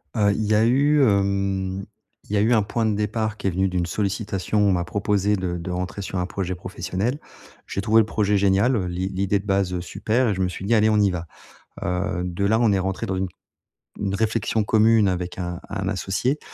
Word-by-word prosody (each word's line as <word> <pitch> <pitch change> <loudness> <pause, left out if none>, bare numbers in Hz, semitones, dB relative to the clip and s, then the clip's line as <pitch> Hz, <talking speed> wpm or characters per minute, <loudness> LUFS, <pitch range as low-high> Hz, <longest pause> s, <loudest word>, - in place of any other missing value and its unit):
Heu, 105 -2 +3
il 110 - -2
y 105 - +1
a 110 - +4
eu, 140 +4 +4
hem 100 -3 0 0.5
il - - -3
y 105 - +3
a - - +3
eu 115 +3 +3
un 110 - +4
point 110 +3 -1
de 110 - +1
départ 110 +1 -1
qui - - -3
est - - +4
venu 95 +2 0
d'une 90 -1 -1
sollicitation, 100 +2 -1
on 100 -1 +4
m'a 90 -2 +1
proposé 100 +2 0
de 90 -2 -3
de 85 +1 -5
rentrer 90 +2 -4
sur 95 -1 -3
un 90 - 0
projet 95 -1 -3
professionnel. 95 - -3 0.5
J'ai 100 - -3
trouvé 110 +2 +4
le 110 - 0
projet 105 -1 +1
génial, 100 +6 +3
heu, 100 -5 0
l'i 90 +2 -2
l'idée 100 +1 0
de 100 - -11
base, 95 -2 +1
heu, 90 - -2
super 115 +6 0
et - - +1
je 95 - -2
me 95 - +2
suis 90 - -7
dit: 110 - +2
«Allez, 110 0 +4
on 105 - +3
y 100 - +4
va.» 85 -2 -4 0.6
Heu, 90 0 -1
de 90 +2 -2
là 110 +3 +3
on 115 -3 +4
est 100 - +2
rentré 95 0 -2
dans 95 - -2
une 95 0 -1 0.7
une 100 -1 -1
réflexion 110 +1 0
commune 110 -1 +4
avec 90 -1 -3
un 90 -1 -4
un 95 -1 -3
associé 105 - -1
100 Hz, 235 wpm, -23 LUFS, 95-110 Hz, 0.7 s, a